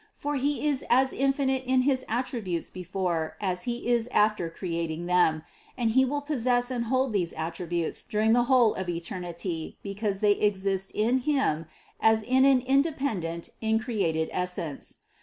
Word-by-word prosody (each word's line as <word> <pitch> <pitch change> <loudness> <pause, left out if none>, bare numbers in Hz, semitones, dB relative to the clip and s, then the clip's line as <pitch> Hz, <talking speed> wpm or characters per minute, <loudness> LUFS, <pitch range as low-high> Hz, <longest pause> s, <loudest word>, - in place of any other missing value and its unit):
For 290 0 -3
He 285 +3 0
is 280 -2 0
as 260 +2 +4
infinite 270 -1 +1
in 260 0 +2
his 260 -1 +2
attributes 225 -7 -2
before 175 -3 -3
as 180 -3 -1
He 240 0 -3
is 240 -1 +2
after 210 -7 +2
creating 165 -1 -4
them, 175 -3 +2 0.3
and 235 -3 +1
He 260 +3 +4
will 290 +3 -2
possess 250 -4 +1
and 240 -2 -1
hold 260 0 +1
these 180 -4 0
attributes 165 +1 -3
during 215 +1 +1
the 240 0 +3
whole 245 -4 +4
of 190 -2 -4
eternity, 170 -1 -4
because 200 0 -3
they 205 -1 +4
ex 200 -2 +1
ist 195 -1 -1
in 235 +5 +2
Him 245 - 0 0.3
as 220 0 +3
in 260 +3 +3
an 270 -2 +5
independent 260 - 0
increated 220 -8 0
Essence. 180 -5 -3
215 Hz, 160 wpm, -27 LUFS, 175-255 Hz, 0.3 s, an